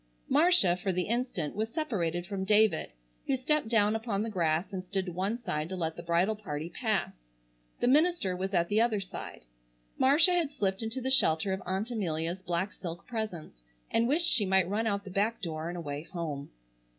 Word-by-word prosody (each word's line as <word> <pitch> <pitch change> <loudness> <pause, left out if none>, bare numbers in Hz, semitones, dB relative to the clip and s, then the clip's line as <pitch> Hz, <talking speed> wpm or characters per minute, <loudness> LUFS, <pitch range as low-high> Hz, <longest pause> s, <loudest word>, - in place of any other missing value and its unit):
Marcia, 290 - +5
for 190 +2 -2
the 180 0 0
instant, 230 - -2
was 220 +2 -1
separated 180 - -2
from 190 0 -4
David, 210 - +3 0.4
who 270 - +2
stepped 280 +1 0
down 215 -2 +3
upon 220 -2 -2
the 225 - -4
grass 170 0 0
and 185 -1 -4
stood 190 0 -2
to 180 - -5
one 190 +6 -2
side 155 -9 -3
to 190 - -4
let 165 -3 -2
the - - -7
bridal 170 +5 +1
party 165 -5 -6
pass. 205 - -2 0.5
The - - +2
minister 295 - +3
was 190 +1 -3
at 170 -3 +2
the 210 +4 +2
other 230 -3 +2
side. 190 - -8 0.5
Marcia 300 +7 +6
had 340 -5 +1
slipped 195 -8 -2
into 225 +4 -3
the 260 +1 -1
shelter 190 -8 +4
of 190 - -4
Aunt 195 +6 -2
Amelia's 175 -4 -2
black 180 +2 -2
silk 170 -2 -7
presence 210 - -5 0.3
and 230 - +2
wished 315 +6 +3
she 235 - +4
might 190 -2 +3
run 215 +4 -1
out 200 -1 -1
the 195 - -9
back 210 +5 0
door 160 -2 -4
and 175 - -5
away 145 -3 -5
home. 160 -5 -5
195 Hz, 200 wpm, -30 LUFS, 170-225 Hz, 0.5 s, Marcia